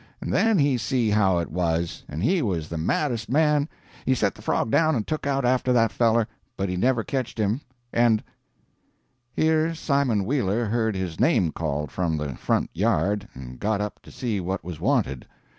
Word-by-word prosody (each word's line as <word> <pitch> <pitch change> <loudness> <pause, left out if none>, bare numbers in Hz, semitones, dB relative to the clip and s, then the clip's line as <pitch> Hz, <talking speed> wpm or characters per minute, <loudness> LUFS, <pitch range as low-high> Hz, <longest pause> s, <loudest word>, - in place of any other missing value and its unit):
And - - -4
then 225 -2 +3
he 140 -5 +3
see 115 -2 +1
how 95 -4 +3
it 85 - -2
was, 85 -1 -1
and 75 +4 -4
he 180 0 +3
was 85 - -2
the 85 - -4
maddest 115 - -1
man 150 +2 +3 0.3
he 130 - +2
set - - +1
the - - -15
frog 110 - 0
down 160 +2 +3
and 110 -4 -1
took 155 -2 -3
out 135 -2 +1
after 125 0 +2
that 115 -3 +3
feller, 115 -1 +2 0.3
but 95 -1 -1
he 90 - -2
never 120 +4 +2
ketched 130 -2 -3
him. 110 +5 0 0.3
And 115 -2 +3 0.6
" 125 -2 -45
[Here 160 +1 +2
Simon 140 -10 +1
Wheeler 115 -3 0
heard 110 -1 0
his 90 -4 -4
name 85 -4 +3
called 75 -2 -3
from 85 -4 -1
the 75 -3 -3
front - - 0
yard, 105 +1 +1
and 65 -1 -9
got 105 0 0
up 105 0 -4
to - - -15
see 115 -5 -2
what 95 0 -3
was 85 -2 -7
wanted. 105 - 0
110 Hz, 195 wpm, -25 LUFS, 90-130 Hz, 0.6 s, then